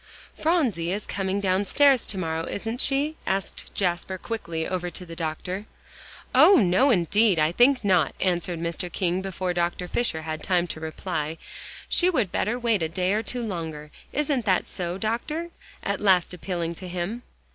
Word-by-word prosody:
"Phronsie 255 - +1
is 205 +2 -3
coming 195 0 -1
downstairs 205 +8 +3
to 200 - -2
morrow, 165 -2 -2
isn't 225 +5 -3
she?" 290 +3 +1
asked 190 0 -2
Jasper 180 0 0
quickly, 170 -6 -4
over 180 -1 -2
to 180 +2 -8
the 165 -1 -9
doctor. 180 +5 -4 0.7
"Oh! 395 - +8
no, 205 - +4
indeed, 205 - +3
I 155 +1 +3
think 245 +4 +4
not," 180 -7 +3
answered 175 -2 0
Mr. 170 +2 -3
King 180 0 0
before 185 -1 -2
Dr. 175 +1 -1
Fisher 175 -7 -1
had 155 -1 -4
time 180 -2 +2
to - - -5
reply. 160 -1 -3 0.5
"She 360 - +3
would 220 - +1
better 225 +4 0
wait 230 -5 +1
a 160 - 0
day 180 +3 0
or 215 - +1
two 245 +2 -4
longer. 160 -7 -5 0.2
Isn't 285 -5 0
that 185 -3 +2
so, 175 0 -3
Doctor?" 300 - -2 0.3
at 200 -1 -2
last 185 -4 +3
appealing 170 -2 -3
to 185 - -6
him. 180 +7 -3
185 Hz, 170 wpm, -25 LUFS, 170-225 Hz, 0.7 s, Oh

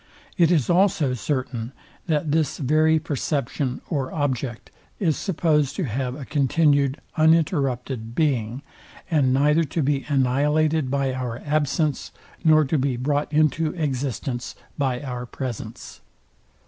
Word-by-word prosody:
It 170 -4 +4
is 160 -8 +2
also 175 -7 +3
certain, 125 -1 -3 0.3
that 155 -2 0
this 155 -2 +1
very 155 +3 +3
perception 140 -3 -2
or 140 -6 -2
object 130 -5 -3 0.3
is 165 -7 +1
supposed 155 -6 +1
to 190 - -2
have 125 0 -2
a 140 -2 -7
continued 140 -1 +2 0.2
uninterrupted 135 -7 +1
being, 130 -4 0 0.5
and 140 -5 +3
neither 150 +5 +3
to 155 +2 -2
be 135 0 0
annihilated 145 +2 +2
by 135 -1 0
our 125 -3 -3
absence, 150 0 0 0.3
nor 155 -2 +5
to 140 +2 0
be 130 -2 0
brought 145 +4 -1
into 155 +1 +2
existence 135 - -3 0.2
by 130 -3 -1
our 125 -3 -5
presence. 125 -3 -7
145 Hz, 125 wpm, -23 LUFS, 130-155 Hz, 0.5 s, nor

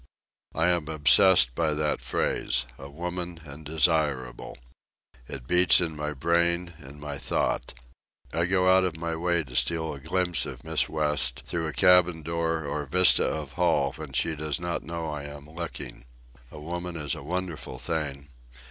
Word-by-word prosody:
I 80 +3 +2
am 85 -4 -1
obsessed 75 -2 +5
by 80 +1 0
that 75 0 -1
phrase—a 60 +2 -2
woman 85 +2 -5
and 75 +2 -10
desirable. 75 -5 -1 0.7
It 65 -3 -7
beats 90 +5 +6
in 80 -3 -2
my 75 0 -4
brain, 85 +3 +1
in 70 +3 -12
my 75 -1 -6
thought. - - -2 0.6
I 85 +1 +1
go 95 0 +2
out 95 0 +5
of 85 -3 -2
my 85 0 -3
way 85 0 0
to 60 -3 -12
steal 80 +1 0
a 70 - -9
glimpse 90 +2 0
of - - -9
Miss 80 0 0
West 75 -5 +1
through 85 -1 -2
a - - -3
cabin 90 -3 +4
door 80 0 -2
or 75 +1 -3
vista 90 +5 +5
of 75 -3 -4
hall 80 -6 +1
when 75 -3 -9
she 80 +4 0
does 75 +1 -3
not 85 -1 -3
know 85 0 -5
I 75 -2 -5
am 70 0 -10
looking. 80 -5 -7 0.4
A - - -11
woman 85 +2 -5
is 75 -3 -2
a - - -6
wonderful 85 +1 -5
thing. 75 -4 -4
80 Hz, 165 wpm, -26 LUFS, 75-85 Hz, 0.7 s, beats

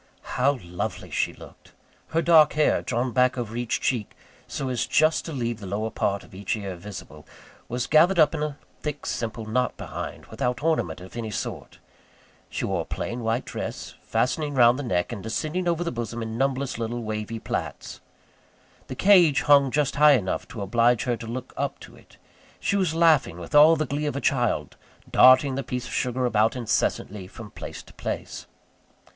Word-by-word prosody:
How 135 +2 +2
lovely 90 +2 -5
she - - 0
looked! - - -15 0.3
Her 165 +1 0
dark 160 -3 +6
hair, 155 0 +2
drawn 120 +2 -1
back 125 +1 +2
over 115 -2 -4
each 120 -1 -1
cheek 115 -6 -2 0.3
so 135 - -4
as 125 -2 -1
just 155 +1 +3
to 165 - -5
leave 120 -5 -3
the 100 - -8
lower 110 +3 -2
part 100 -1 -1
of - - -17
the 95 +2 -10
ear 100 -3 -5
visible, 85 -5 -10 0.4
was 125 +1 -2
gathered 170 +5 +4
up 155 -2 +5
into 150 -1 -1
a 145 -1 -9 0.2
thick 150 -1 -5
simple 115 -1 -3
knot 125 +3 -1
behind, - - -6
without 125 +3 -3
ornament 155 - 0
of 90 +4 -12
any 115 -2 -4
sort. 105 - -5 0.7
She - - -3
wore - - -1
a - - -6
plain 120 - -4
white 115 +2 -1
dress - - -6
fastening 140 +6 -1
round 120 +1 +5
the - - -3
neck, 90 -6 -1
and 110 -4 -5
descending 155 - -2
over 170 0 +1
the 170 - -2
bosom 115 -1 -4
in 110 0 -5
numberless 135 0 -1
little 120 +1 -3
wavy 110 +1 -4
plaits. - - -5 0.9
The 130 - -6
cage 175 -5 +5
hung 140 -2 +5
just 145 0 0
high 150 0 +7
enough 100 -8 -1
to 110 -4 -6
oblige 115 +3 +2
her 120 -2 0
to 115 0 -9
look 125 +2 -6
up - - -2
to - - -12
it. - - -20 0.4
She - - 0
was 185 -5 +1
laughing 155 - +3
with 90 - -9
all 150 +2 +8
the 155 -1 -1
glee 145 +3 -2
of 145 - -2
a - - -1
child; 120 - 0 0.3
darting 130 +2 +6
the 135 - -2
piece 125 -2 -4
of - - -8
sugar 125 0 0
about 110 -1 +2
incessantly 105 -4 -1
from 105 +1 -11
place - - -8
to - - -18
place. - - -5
125 Hz, 190 wpm, -25 LUFS, 110-145 Hz, 0.9 s, all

